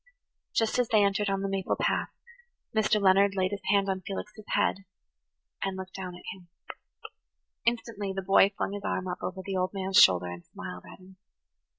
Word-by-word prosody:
Just 225 +2 +2
as 245 - +2
they 215 -2 +4
entered 200 +1 +1
on 195 0 -1
the - - 0
maple 195 -1 -1
path - - 0 0.6
Mr. 215 -1 +3
Leonard 195 0 +4
laid 185 0 +1
his 200 -1 -4
hand 200 0 +3
on 190 -1 -1
Felix's 210 +3 -7
head 195 -1 +1 0.8
and 195 -1 -2
looked 190 0 -7
down 185 -2 -6
at 175 - -13
him. 185 -2 -16 1.2
Instantly 225 -4 -1
the 190 0 -4
boy 195 +1 +5
flung - - -1
his 205 -1 -6
arm 185 - -2
up 180 - -4
over 190 +1 -5
the 195 - -3
old 185 +2 -1
man's 190 0 0
shoulder 90 -1 +6
and 90 0 -7
smiled - - -9
at - - -12
him. 185 0 -17
195 Hz, 190 wpm, -28 LUFS, 185-205 Hz, 1.2 s, shoulder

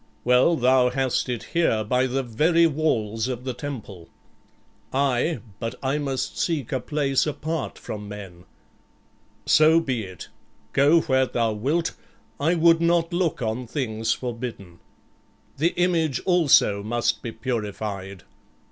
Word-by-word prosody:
"Well, 125 +7 +4
thou 130 -1 +4
hast 130 0 -1
it 120 -2 -3
here, 165 -11 +2
by 125 +4 +1
the 135 +1 -1
very 160 +9 +3
walls 120 -8 0
of 125 -1 -4
the 130 -1 -3
temple." 110 - -8 0.8
"Aye, 135 +1 0 0.2
but 115 -1 -4
I 135 +3 0
must 135 -3 -3
seek 155 -8 -1
a 130 - 0
place 135 +2 0
apart 155 0 -3
from 105 -1 -7
men." 95 -4 -10 1.0
"So 155 +2 +5
be 130 -8 -2
it; 95 -2 -10 0.4
go 150 +4 +5
where 130 -4 +2
thou 115 -3 0
wilt; 145 +11 -1 0.5
I 160 +5 +2
would 165 0 +4
not 170 0 +2
look 170 -7 0
on 115 +3 -3
things 115 -4 -2
forbidden." 115 -8 -5 0.8
"The 165 +5 +2
image 165 -7 +1
also 155 - +4
must 120 +3 -1
be 115 - -5
purified." 105 -5 -4
130 Hz, 135 wpm, -24 LUFS, 110-155 Hz, 1.0 s, So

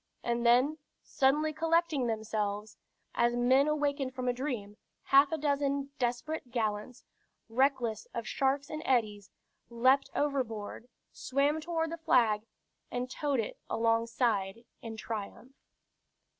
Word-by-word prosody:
And 235 0 -1
then, 255 +6 +4 0.2
suddenly 300 +3 +2
collecting 325 -4 +1
themselves, 215 -2 -2 0.4
as 240 0 +2
men 260 +4 +4
awakened 285 -3 -1
from 255 -1 -3
a 245 - +2
dream, 240 -6 -4 0.3
half 275 +2 +5
a 320 - 0
dozen 280 -1 0
desperate 245 +3 -2
gallants, 225 0 -3 0.4
reckless 240 -3 +1
of 230 -1 -5
sharks 275 +1 0
and 310 0 -4
eddies, 210 -6 0 0.4
leaped 255 +4 +3
overboard, 245 -6 -2 0.2
swam 285 +4 0
toward 325 0 -2
the 335 - -4
flag, 225 -8 +2 0.4
and 250 +1 -3
towed 280 -4 0
it 210 - -7
alongside 230 -2 0 0.2
in 225 -1 -7
triumph. 220 +3 -6
250 Hz, 120 wpm, -31 LUFS, 225-280 Hz, 0.4 s, half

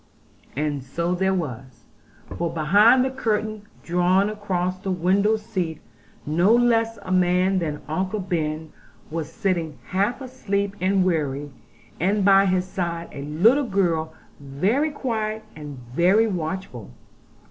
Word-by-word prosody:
And 145 -1 -2
so 170 +7 -2
there 190 +1 +1
was; 130 -7 -6 0.5
for 170 -1 -2
behind 205 +11 +5
the 265 - -1
curtain 215 -4 -2 0.2
drawn 180 +4 +2
across 185 -3 -2
the 190 - -5
window 190 +4 +2
seat 180 -7 -4 0.5
no 170 +7 +3
less 230 -2 +2
a 185 - -6
man 185 +1 +3
than 150 -4 -4
Uncle 185 +6 -2
Ben 160 -4 -3 0.4
was 160 -1 -4
sitting 170 -6 -2
half 200 +7 0
asleep 200 -7 -3
and 190 0 +2
weary; 145 -5 -1 0.5
and 195 +3 +1
by 195 0 +6
his 185 -1 +1
side 170 -2 -4
a 140 - -7
little 215 - +3
girl 170 -6 0 0.3
very 185 - 0
quiet 220 -6 -3
and 150 -3 -8 0.2
very 190 +7 +4
watchful. 180 - -4
185 Hz, 130 wpm, -23 LUFS, 160-210 Hz, 0.5 s, by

